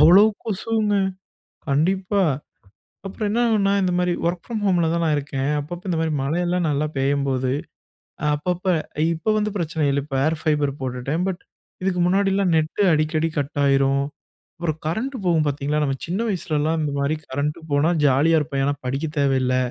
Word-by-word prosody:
அவ்வளோ 180 +7 +8 0.2
கொசுங்க. 215 0 0 0.8
கண்டிப்பா. 185 +6 +2 0.8
அப்புறம் 205 +2 -3
என்னாகும்ன்னா, 220 -4 +2
இந்த 180 -1 +1
மாதிரி 180 -1 +1
ஒர்க் 175 0 -2
ஃப்ரம் 225 -3 -4
ஹோம்ல 175 -4 +3
தான் 170 - 0
நான் 155 - +2
இருக்கேன். 140 -1 -2
அப்பப்ப 170 +5 -7
இந்த 175 - 0
மாரி 160 -1 0
மழையெல்லா 175 +4 0
நல்லா 150 +2 0
பெய்யும்போது 135 -1 0 0.7
அ - - +1
அப்பப்ப 180 +4 -3 0.5
இப்போ 165 +6 -3
வந்து 210 0 0
பிரச்சனை 160 -3 -2
இல்ல, 140 0 +1
இப்போ 135 - -5
Air 160 - +2
Fiber 150 -2 +2
போட்டுட்டேன் 130 +6 -2
பட் 190 -2 -3 0.4
இதுக்கு 185 -1 0
முன்னாடிலா 195 +1 +2
நெட் 160 +5 0
அடிக்கடி 155 +1 +1
கட்டாயிரும். 140 -1 +2 0.6
அப்புறம் 160 -2 -2
கரண்ட் 230 - -2
போவும் 165 -3 +2
பார்த்தீங்களா, 145 +1 -1
நம்ம 135 -2 -1
சின்ன 180 +5 -2
வயசுலலா 160 -5 0
இந்த 150 -2 -1
மாதிரி 140 +3 0
கரண்ட் 145 +3 -2
போனா 145 +3 +3 0.2
ஜாலியா 150 +5 +4
இருப்போம் 140 -2 -2
ஏன்னா 145 +1 +1
படிக்கத் 150 +4 -3
தேவையில்ல. 130 -2 +2
155 Hz, 155 wpm, -22 LUFS, 140-180 Hz, 0.8 s, அவ்வளோ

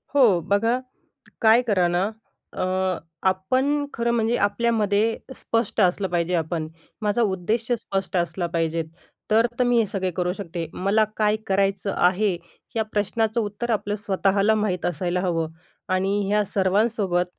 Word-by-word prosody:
हो. 230 -11 +5
बघा, 225 +7 +1 0.6
काय 225 +2 +6
करा 185 -5 +3
ना, 175 +1 +1 0.5
अ, - - -2 0.6
आपण 260 +10 0
खरं 235 0 0
म्हणजे 230 0 +1
आपल्यामध्ये 215 0 +1 0.2
स्पष्ट 230 -1 -1
असलं 190 +1 +2
पाहिजे 175 0 0
आपण. 160 -1 -2 0.3
माझा 210 +2 +1
उद्देश 215 +3 -1
स्पष्ट 195 -3 -3
असला 170 0 -1
पाहिजेत. 165 -1 0 0.5
तर 225 +2 +5
त - - +4
मी 245 -1 +3
हे 225 - +3
सगळे 190 -2 -2
करू 180 0 0
शकते. 170 -4 -5
मला 200 +4 +2
काय 210 0 +3
करायचं 195 0 +1
आहे? 185 +1 +2 0.4
या 225 - +2
प्रश्नाचं 220 +2 0
उत्तर 210 +3 -4
आपलं 205 -1 -1
स्वतःला 200 +1 +2
माहीत 205 -4 -1
असायला 175 +1 -1
हवं. 165 -3 -1 0.4
आणि 190 +2 +1
ह्या 210 +1 +2
सर्वांसोबत 195 -1 +1
200 Hz, 140 wpm, -24 LUFS, 180-220 Hz, 0.6 s, काय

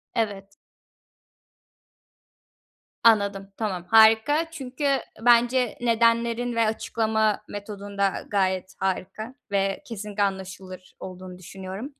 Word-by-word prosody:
Evet. 200 -3 -2 2.5
Anladım. 200 -3 +3
Tamam. 185 -5 -3
Harika 225 +9 +5
çünkü 275 -2 -5 0.4
bence 245 0 +4
nedenlerin 235 +1 +2
ve 230 -1 +3
açıklama 220 -1 0
metodun 205 0 -8
da 200 -1 0
gayet 190 -2 -1
harika 195 +6 -3 0.2
ve 195 -1 0
kesinlikle 210 -2 -3
anlaşılır 190 -1 -5
olduğunu 185 -1 -9
düşünüyorum. 190 - -8
210 Hz, 90 wpm, -25 LUFS, 195-230 Hz, 2.5 s, Harika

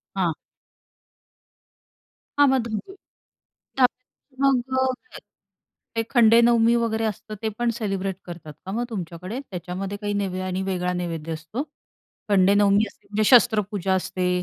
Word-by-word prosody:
हां. 175 -4 +1 2.1
हां, 285 - +7
मग 265 -1 +3
धुवून 225 - -5 0.8
त्यात 255 -1 +6 0.5
मग 270 -3 +4 0.2
अ, 260 - -2 0.8
ते 225 - +1
खंडेनवमी 235 -1 +5
वगैरे 225 -1 0
असतं 215 0 -4
ते 220 - +1
पण 240 0 +2
सेलिब्रेट 195 -4 -2
करतात 165 -4 -9
का 190 - -5
मग 235 +3 -1
तुमच्याकडे? 185 +3 -5
त्याच्यामध्ये 185 +3 -5
काही 205 0 -2
नैवे 190 -2 -2
आणि 185 0 -2
वेगळा 180 -1 -1
नैवेद्य 165 -2 -4
असतो? 165 - -5 0.7
खंडेनवमी 200 +1 +4
असते - - -19
म्हणजे 215 +1 +1
शस्त्रपूजा 210 -6 +4
असते 180 0 -1
205 Hz, 125 wpm, -24 LUFS, 185-230 Hz, 2.1 s, हां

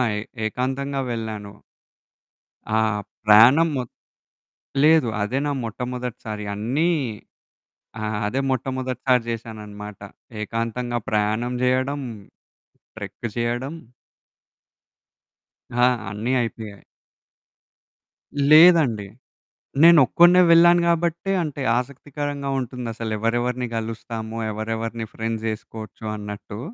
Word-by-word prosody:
ఏ - - -2 0.3
-ఏకాంతంగా 135 +4 -2
వెళ్ళాను. 110 -3 -5 1.2
ఆ! 110 - +3 0.5
ప్రాణం 120 +10 +7
మొ 130 - 0 1.0
లేదు 155 -4 +5
అదే 120 +6 -1
నా 145 - 0
మొట్టమొదటిసారి 120 -2 -5
అన్నీ 130 +11 0 1.1
ఆ! - - -4 0.2
అదే 130 +6 -1
మొట్టమొదటిసారి 130 -1 0
చేశానన్నమాట. 105 -2 -7 0.4
ఏకాంతంగా 115 +2 -2
ప్రయాణం 110 +3 0
చేయడం, 130 +3 +1 1.0
ట్రెక్కు 120 - -6
చేయడం 120 +4 -2 2.0
ఆ! 120 +1 +3 0.3
అన్ని 110 +5 -2
అయిపోయాయి. 110 -3 -7 1.7
లేదండి. 155 - +6 0.8
నేనొక్కడినే 170 +3 +7
వెళ్ళాను 175 +1 +7
కాబట్టే, 170 +2 0
అంటే 145 -3 -5 0.2
ఆసక్తికరంగా 140 +2 -5
ఉంటుందసలు 115 -3 -5
ఎవరెవరిని 120 +2 0
కలుస్తాము, 115 0 -5
ఎవరెవరిని 115 +1 -4
ఫ్రెండ్స్ 115 0 -3
జేసుకోవచ్చు, 110 0 -8
అన్నట్టు. 105 0 -7
120 Hz, 80 wpm, -23 LUFS, 110-135 Hz, 2.0 s, ప్రాణం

